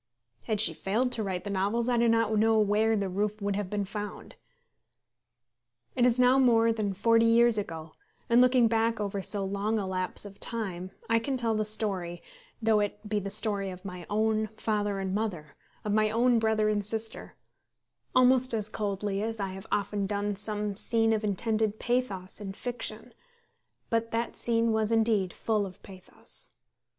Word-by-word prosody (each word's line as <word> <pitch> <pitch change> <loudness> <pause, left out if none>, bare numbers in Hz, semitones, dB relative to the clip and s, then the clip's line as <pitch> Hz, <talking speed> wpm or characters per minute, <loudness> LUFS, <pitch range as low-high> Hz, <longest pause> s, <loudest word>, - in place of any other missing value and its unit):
Had 215 -2 0
she 180 -6 +4
failed 215 +10 -1
to 230 - +1
write 190 -3 -3
the 205 - -4
novels, 205 +5 0
I 245 - +2
do 235 0 +3
not 225 -1 +2
know 220 +1 +3
where 215 +1 +2
the 200 -1 -1
roof 205 +3 -2
would 200 -1 -1
have 205 -2 -3
been 205 0 -2
found. 205 +1 -7 1.6
It 250 -2 +4
is 240 0 +2
now 250 +2 +5
more 230 -3 +4
than 205 -3 -2
forty 230 +3 +4
years 230 -1 +5
ago, 165 -5 -6 0.4
and 235 0 +5
looking 250 -2 +5
back 225 0 +1
over 200 -1 -2
so 200 +1 -1
long 200 +3 -1
a 205 - -2
lapse 185 +1 -2
of 200 -1 -11
time 190 -6 -2 0.2
I 230 0 +3
can 265 +3 -2
tell 230 -2 +1
the 215 0 0
story, 195 -5 -1 0.4
though 220 -2 +3
it 205 +1 -3
be 210 0 0
the 200 0 -5
story 200 -1 -1
of 185 +1 -10
my 180 -3 -7
own 215 +1 +1
father 205 -2 -1
and 190 -1 -3
mother, 195 -8 -3 0.3
of 210 - 0
my 215 0 +3
own 235 +2 +3
brother 220 -1 +1
and 210 -1 +1
sister, 220 +2 -2 0.8
almost 255 -1 +4
as 215 -1 -1
coldly 200 -1 -2
as 225 +1 -3
I 195 -1 -2
have 190 +1 -9
often 200 -1 -1
done 205 0 -1
some 210 0 -2
scene 225 +2 +2
of 220 0 -1
intended 215 +1 0
pathos 215 -6 -2
in 195 -2 -5
fiction; 245 +4 -5 0.8
but 230 0 +1
that 230 +1 -2
scene 230 -1 +1
was 220 0 +1
indeed 220 -5 +2
full 215 -2 -1
of 185 -2 -9
pathos. 190 -2 -8
215 Hz, 180 wpm, -28 LUFS, 200-230 Hz, 1.6 s, now